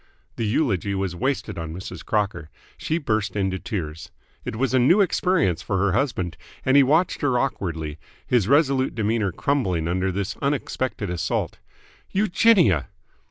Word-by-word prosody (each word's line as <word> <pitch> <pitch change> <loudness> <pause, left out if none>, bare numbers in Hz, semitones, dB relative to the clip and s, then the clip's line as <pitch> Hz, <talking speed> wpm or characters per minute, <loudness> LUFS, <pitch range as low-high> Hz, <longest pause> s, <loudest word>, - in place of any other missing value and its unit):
The 115 - -2
eulogy 105 - 0
was 95 -2 -2
wasted 130 -4 -2
on 80 -1 -5
Mrs. 95 - -8
Crocker. 100 -7 -1 0.3
She 160 - -2
burst 110 - -1
into 95 -2 -1
tears. 80 -7 -5 0.3
It - - -5
was 130 +3 0
a 130 - +4
new 165 +12 +5
experience 180 - +2
for 95 +3 -2
her 100 +1 +2
husband, 95 - -1 0.3
and 130 - +3
he 140 - +8
watched 155 +7 +2
her 135 -4 +2
awkwardly, 80 - -2 0.3
his 120 -6 +2
resolute 140 -1 +3
demeanour 110 -2 0
crumbling 90 - 0
under 95 +2 0
this 100 +1 -3
unexpected 130 -7 -2
assault. 85 -2 -2 0.5
"Eugenia!" 190 - +3
105 Hz, 150 wpm, -23 LUFS, 90-135 Hz, 0.5 s, he